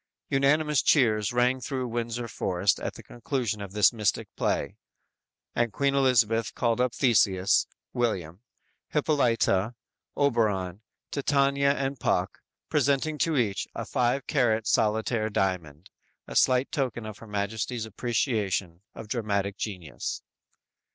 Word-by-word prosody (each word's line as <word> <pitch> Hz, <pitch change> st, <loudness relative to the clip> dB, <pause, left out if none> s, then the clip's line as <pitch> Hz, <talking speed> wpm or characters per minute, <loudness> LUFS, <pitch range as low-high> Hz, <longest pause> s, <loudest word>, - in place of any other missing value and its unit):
"_ -, -, +1 dB
Unanimous 150 Hz, +1 st, +3 dB
cheers 110 Hz, -5 st, +3 dB
rang 125 Hz, +1 st, +2 dB
through 130 Hz, -1 st, -3 dB
Windsor 120 Hz, 0 st, -3 dB
forest 95 Hz, -2 st, 0 dB
at -, -, -4 dB
the -, -, -11 dB
conclusion 120 Hz, -3 st, -3 dB
of 100 Hz, -1 st, -7 dB
this 105 Hz, +3 st, +4 dB
mystic 105 Hz, -3 st, -1 dB
play, -, -, -1 dB, 0.8 s
and 120 Hz, -1 st, 0 dB
Queen 140 Hz, +4 st, +1 dB
Elizabeth 115 Hz, -5 st, +2 dB
called 115 Hz, 0 st, +1 dB
up 125 Hz, -1 st, 0 dB
Theseus 100 Hz, -7 st, +3 dB, 0.3 s
(William), 95 Hz, -7 st, -2 dB, 0.5 s
Hippolyta, 120 Hz, -, +1 dB, 0.4 s
Oberon, 105 Hz, -9 st, +1 dB, 0.3 s
Titania 140 Hz, 0 st, +2 dB
and 135 Hz, -1 st, -3 dB
Puck, -, -, 0 dB, 0.3 s
presenting 145 Hz, +2 st, +1 dB
to 160 Hz, -3 st, +1 dB
each 105 Hz, -6 st, 0 dB
a -, -, -4 dB
five 125 Hz, +2 st, 0 dB
carat 115 Hz, -6 st, +1 dB
solitaire 110 Hz, +1 st, +1 dB
diamond 90 Hz, -6 st, -2 dB, 0.4 s
a -, -, -8 dB
slight 130 Hz, +1 st, +3 dB
token 125 Hz, -6 st, -2 dB
of 105 Hz, -1 st, -8 dB
Her 115 Hz, -, -12 dB
Majesty's 110 Hz, +3 st, -3 dB
appreciation 105 Hz, -6 st, -1 dB
of 110 Hz, -, -8 dB
dramatic 100 Hz, -3 st, -1 dB
genius. 90 Hz, -8 st, -5 dB
115 Hz, 125 wpm, -27 LUFS, 105-130 Hz, 0.8 s, this